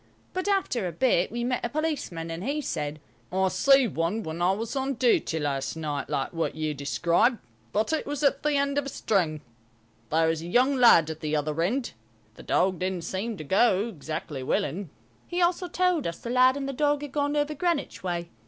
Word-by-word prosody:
But 370 +1 -2
after 380 - +1
a - - -3
bit 190 -2 +2
we 235 +1 -3
met 250 +1 -1
a 240 - -1
policeman, 265 - -3
and 165 +2 -5
he 285 +5 -1
said, 150 - -3 0.3
"I 190 +1 +2
see 275 +5 +5
one 175 +4 -1
when 160 0 -5
I 180 +2 +4
was 225 +6 -4
on 270 0 -1
duty 230 -8 +2
last 140 -2 -2
night, 150 -3 -3
like 135 - -2
what 165 -3 -2
you 155 -1 -2
describe, 170 - +1 0.3
but 215 +9 0
it 315 - -1
was 290 0 -3
at 280 - +3
the 300 -1 +1
end 280 0 +1
of 280 - -4
a - - -3
string. 170 - 0 0.7
There 160 +1 +3
was 160 -1 0
a 170 - -7
young 255 +9 +3
lad 200 - +6
at 160 - -8
the 155 -1 -2
other 150 +1 -1
end. 235 +9 0 0.4
The - - -13
dog 185 -1 +1
didn't 185 -2 -2
seem 195 +6 -3
to 155 - -6
go 195 +6 +3
exactly 155 -5 -5
willing." 155 +7 -1 0.4
He 350 - -3
also 360 +1 +2
told 360 -3 +1
us 170 - -4
the 235 - -6
lad 255 +2 +5
and 275 -1 -3
the 275 - -3
dog 290 +1 +1
had 290 - -6
gone 290 +1 0
over 295 +1 0
Greenwich 335 0 -1
way. 175 -2 -3
205 Hz, 210 wpm, -27 LUFS, -, 0.7 s, lad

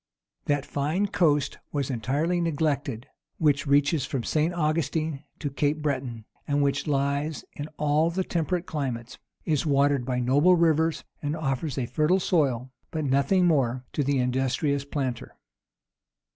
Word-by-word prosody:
That 145 -1 0
fine 155 +8 0
coast 150 -5 +1
was 140 -2 -1
entirely 145 +9 0
neglected 145 -7 -1 0.3
which 145 -2 +2
reaches 145 +1 +3
from 130 -2 -3
St. 155 +6 +1
Augustine 155 -2 -1
to 145 -3 -4
Cape 145 +2 0
Breton, 130 -6 -2 0.2
and 145 0 +2
which 140 +2 0
lies 140 +2 -1
in 145 - -6
all 150 +2 +2
the 185 +3 -1
temperate 175 +1 -1
climates, 130 -6 -4 0.3
is 150 -4 +1
watered 140 -2 +2
by 125 0 -1
noble 145 +9 +4
rivers, 160 -1 +2 0.2
and 145 +1 -2
offers 140 -2 -2
a 130 - 0
fertile 155 +8 +2
soil, 135 -9 +1 0.2
but 155 -2 -3
nothing 140 +8 +3
more, 130 -6 +1
to 145 - 0
the 140 0 +1
industrious 130 +3 0
planter. 135 -4 -4
145 Hz, 145 wpm, -26 LUFS, 135-160 Hz, 0.3 s, noble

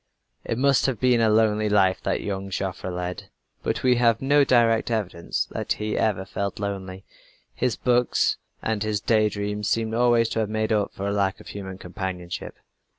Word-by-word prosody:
It 115 - -3
must 140 +1 +3
have 130 -4 -2
been 125 -2 +3
a 110 - +4
lonely 110 -1 +3
life 95 -2 +3
that - - -1
young 100 -1 -4
Joffre 95 -1 -3
led 90 0 -5 0.3
but - - -2
we 125 -1 +4
have 115 -2 +3
no 145 +2 +4
direct 115 -4 +3
evidence 95 -7 -2
that - - -1
he 105 0 -3
ever 100 -4 0
felt 100 +1 -4
lonely. 95 -2 -5 0.5
His 125 -1 0
books 125 -1 +2 0.3
and 110 -2 -1
his 105 -1 0
day 110 -1 +2
dreams 105 +1 -3
seem 110 -1 0
always 120 -1 +3
to - - -2
have 110 -2 0
made 110 +1 0
up 105 -2 +1
for 100 - -5
a 100 - 0
lack 100 -1 0
of - - -12
human 95 -2 -7
companionship. 90 -2 -6
105 Hz, 185 wpm, -24 LUFS, 95-115 Hz, 0.5 s, a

